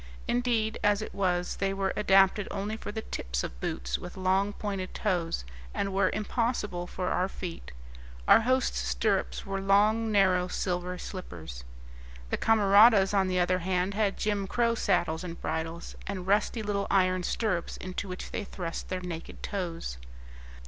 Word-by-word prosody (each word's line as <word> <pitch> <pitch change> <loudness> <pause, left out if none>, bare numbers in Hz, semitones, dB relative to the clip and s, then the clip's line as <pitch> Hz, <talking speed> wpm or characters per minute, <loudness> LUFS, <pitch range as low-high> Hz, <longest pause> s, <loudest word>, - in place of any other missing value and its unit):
Indeed, 235 -3 +1
as 205 +1 +3
it - - -7
was, 180 -2 0
they 195 0 0
were 195 -1 0
adapted 195 0 +4
only 205 +2 -3
for 215 - -6
the 220 +1 -5
tips 60 0 -3
of - - -6
boots - - -2
with - - -9
long, 190 +2 +2
pointed 195 -3 -4
toes, 175 - -1 0.3
and 195 -1 -1
were 190 -1 +3
impossible 210 -4 -1
for 180 0 -3
our 185 +1 +1
feet; 175 - -7 0.6
our - - +8
hosts' 255 - +1
stirrups 60 +1 0
were 195 0 -3
long, 210 +3 +3
narrow 185 -3 +4
silver 180 0 -2
slippers. 80 - -7 0.7
The - - +1
camaradas, 210 -1 +6
on 195 -2 +3
the 185 0 +1
other 180 +1 +2
hand, 185 +2 0
had 205 -1 +1
jim 205 -2 -1
crow 235 +2 +2
saddles 165 -7 +1
and 170 -2 -6
bridles, 160 +1 -4
and 190 -2 -4
rusty 210 +3 +1
little 200 -1 -1
iron 185 -1 +3
stirrups 185 -2 -1
into 185 +2 -5
which 180 - -6
they - - -3
thrust 175 -4 -5
their 185 0 -2
naked 170 -2 -7
toes. 165 - -4
190 Hz, 160 wpm, -29 LUFS, 180-205 Hz, 0.7 s, our